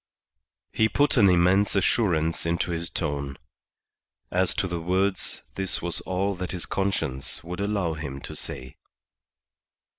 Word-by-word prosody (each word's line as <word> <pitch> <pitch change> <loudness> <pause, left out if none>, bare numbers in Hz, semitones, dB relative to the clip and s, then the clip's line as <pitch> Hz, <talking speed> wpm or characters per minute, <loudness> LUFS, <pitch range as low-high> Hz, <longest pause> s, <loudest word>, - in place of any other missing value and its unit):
He 110 0 +3
put 145 +7 +3
an 105 -6 +6
immense 90 +4 +4
assurance 85 -5 +2
into 85 +1 0
his 85 0 -2
tone. 70 -4 -3 0.9
As 90 0 +3
to 95 - 0
the 85 -2 -3
words, 95 +3 0
this 95 -1 -2
was 85 0 -1
all 95 +2 0
that 90 0 -4
his 90 - -3
conscience 85 -11 -2
would 90 +2 -6
allow 100 -5 0
him 70 -3 -5
to - - -7
say. 65 0 -6
90 Hz, 140 wpm, -26 LUFS, 80-100 Hz, 0.9 s, an